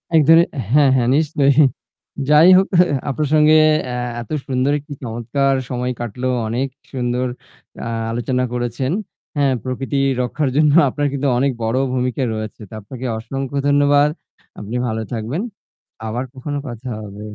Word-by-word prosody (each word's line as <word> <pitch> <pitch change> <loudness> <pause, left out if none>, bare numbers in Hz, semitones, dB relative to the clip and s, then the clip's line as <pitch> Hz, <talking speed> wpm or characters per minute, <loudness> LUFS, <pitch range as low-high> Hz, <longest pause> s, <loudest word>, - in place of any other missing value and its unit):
এক 155 - +7
ধরনের 165 +1 +7 0.2
হ্যাঁ, 145 -1 +5
হ্যাঁ 120 -1 +2
নিশ্চয়ই। 150 -1 +3 0.7
যাই 150 +4 +7
হোক 190 - +3 0.4
আপনার 150 +2 -1
সঙ্গে 155 0 +5 0.3
এ্যা 125 - -3 0.2
এত 120 - -11 0.2
সুন্দর 130 +1 +1
একটি 145 +1 -10
চমৎকার 120 +4 0 0.2
সময় 125 0 -2
কাটলো। 120 +2 -3 0.2
অনেক 120 +5 -1 0.3
সুন্দর 125 0 -1 0.6
আ - - -3 0.2
আলোচনা 125 +2 -1
করেছেন। 120 +2 -2 0.5
হ্যাঁ, 140 -2 +3
প্রকৃতি 135 +2 -2 0.2
রক্ষার 135 +3 -1
জন্য 150 -1 +4 0.2
আপনার 145 +2 -1
কিন্তু 140 0 -1
অনেক 140 +2 +2
বড় 115 +3 0 0.2
ভূমিকা 125 +1 -1
রয়েছে। 110 0 -6
তো - - -14
আপনাকে 125 +5 -8
অসংখ্য 135 +4 -5
ধন্যবাদ। 145 +1 +4 0.5
আপনি 105 +3 -6
ভালো 110 0 -2
থাকবেন। 120 - -3 0.7
আবার 120 +3 -2
কখনো 145 +2 -5
কথা 120 +1 -7
হবে। 105 0 -9
130 Hz, 145 wpm, -19 LUFS, 120-145 Hz, 0.7 s, এক